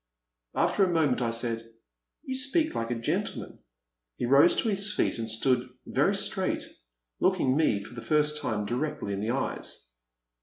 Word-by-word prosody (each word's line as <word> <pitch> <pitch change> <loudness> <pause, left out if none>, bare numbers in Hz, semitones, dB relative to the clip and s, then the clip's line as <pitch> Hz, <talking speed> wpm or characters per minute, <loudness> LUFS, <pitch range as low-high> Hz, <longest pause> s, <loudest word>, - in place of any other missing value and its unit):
*' - - -59
After 200 - +3
a 190 - +3
moment 155 -7 +2
I 120 - +1
said, 115 0 -1 0.3
* - - -58
' - - -58
You 260 -2 -3
speak 280 +5 +1
like 115 0 -2
a 120 - 0
gen 115 0 0
tleman. - - -8 0.6
He - - -2
rose 140 +7 +6
to 225 - +1
his 200 0 -1
feet - - 0
and 115 0 -3
stood 125 +3 +1 0.2
very - - +2
straight, - - +1 0.6
looking 180 -9 +2
me, 125 -10 +2
for 115 - -12
the 120 - -7
first 150 +1 +1
time, 105 -2 -1
directly 125 -1 -2
in 100 - -3
the 110 - -2
eyes. 120 - -3
130 Hz, 190 wpm, -28 LUFS, 115-165 Hz, 0.6 s, rose